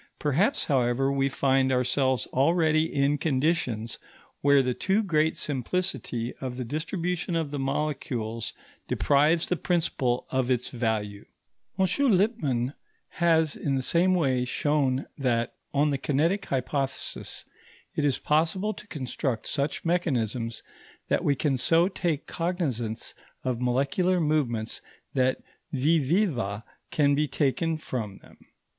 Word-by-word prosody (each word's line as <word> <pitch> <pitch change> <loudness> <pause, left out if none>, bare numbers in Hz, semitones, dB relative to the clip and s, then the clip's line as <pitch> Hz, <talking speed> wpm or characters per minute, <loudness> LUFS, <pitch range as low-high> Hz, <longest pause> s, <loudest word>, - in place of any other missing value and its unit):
Perhaps, 165 - +1
however, 135 -1 +2
we 135 0 +1
find 135 -1 +2
ourselves 130 0 +1
already 160 +2 +3
in 140 +1 +1
conditions 130 -7 0 0.4
where 140 -1 +5
the 125 0 0
too 195 - +1
great 160 -4 +1
simplicity 135 -4 -2
of 125 -2 -5
the 125 - -3
distribution 170 - -2
of 160 -3 -1
the 145 - -3
molecules 135 -5 -2 0.4
deprives 150 +4 +3
the 180 - +1
principle 160 -9 0
of 130 -1 0
its 125 -1 +1
value. 110 -4 -2 0.5
M. 190 - +4 0.3
Lippmann 150 - +1 0.5
has 160 -3 +3
in 140 -2 -1
the 130 - -1
same 180 +6 +3
way 130 -7 +2
shown 135 +1 0
that, 120 -3 0 0.2
on 145 +1 +2
the 140 - -1
kinetic 165 +9 +1
hypothesis, 135 +1 -2 0.5
it 150 - -1
is 140 -3 +2
possible 165 +7 +1
to 215 - -12
construct 130 - -3
such 140 +3 -1
mechanisms 120 -9 0 0.5
that - - +1
we 140 - +3
can 135 -1 0
so 165 +7 +4
take 170 -6 -2
cognizance 145 - -2 0.3
of 125 -2 -2
molecular 140 +9 +1
movements 135 -9 0 0.3
that 130 -1 +1 0.3
vis 150 +4 +2
viva 130 - 0 0.3
can 145 -2 +3
be 150 +2 +2
taken 155 +3 0
from 110 -10 -5
them. - - -19
140 Hz, 130 wpm, -27 LUFS, 125-165 Hz, 0.5 s, where